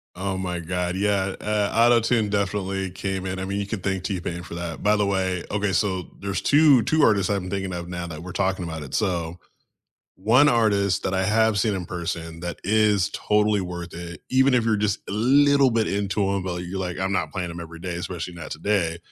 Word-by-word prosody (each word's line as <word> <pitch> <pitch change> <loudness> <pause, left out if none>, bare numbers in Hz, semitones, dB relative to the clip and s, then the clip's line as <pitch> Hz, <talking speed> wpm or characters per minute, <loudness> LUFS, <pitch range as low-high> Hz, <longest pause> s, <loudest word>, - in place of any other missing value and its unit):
Oh 95 +1 -2
my 90 -2 -3
God, 90 +1 -2
yeah. 100 -1 0
Uh, 105 -1 0
Auto-Tune 115 -1 +4
definitely 100 -1 -1
came 95 +1 -4
in, 95 0 -3
I 95 - -3
mean, 100 +1 -2
you 100 - -3
can 110 0 -3
thank 95 -1 -2
T-Pain 85 -2 -3
for 85 - -8
that. 85 -1 -5
By 105 +1 +3
the 105 -1 +1
way, 95 -2 0
okay, 105 -1 0
so 95 -1 0
there's 100 -1 -3
2, 145 -4 +5
2 155 +7 +2
artists 100 -5 +3
I've 100 -2 0
been 90 0 -7
thinking 95 -2 -3
of 85 0 -5
now 90 -1 -5
that 80 -1 -8
we're 90 - -7
talking 95 -1 -1
about 80 -2 -5
it. 65 - -10
So, 85 -4 -1 0.8
one 120 +9 +5
artist 100 -6 +2
that 95 - -1
I 95 0 +1
have 110 +1 +3
seen 105 +2 +1
in 90 -2 -4
person 85 -1 -5
that 90 0 -5
is 105 -1 +3
totally 105 -1 +2
worth 90 -1 -6
it, 85 0 -8
even 130 +1 +4
if 125 -2 +3
you're 110 -1 +2
just 105 -2 0
a - - -4
little 140 +4 +4
bit 115 -2 +1
into 100 +1 -1
him, 100 -1 0
but 90 -1 -4
you're 90 +2 -5
like, 90 -2 -3
"I'm 95 +1 -1
not 80 -5 -1
playing 90 -2 -3
him 85 - -7
every 85 0 -9
day, 90 0 -4
especially 85 0 -5
not 85 - -8
today," 90 -5 0
95 Hz, 225 wpm, -24 LUFS, 90-105 Hz, 0.8 s, 2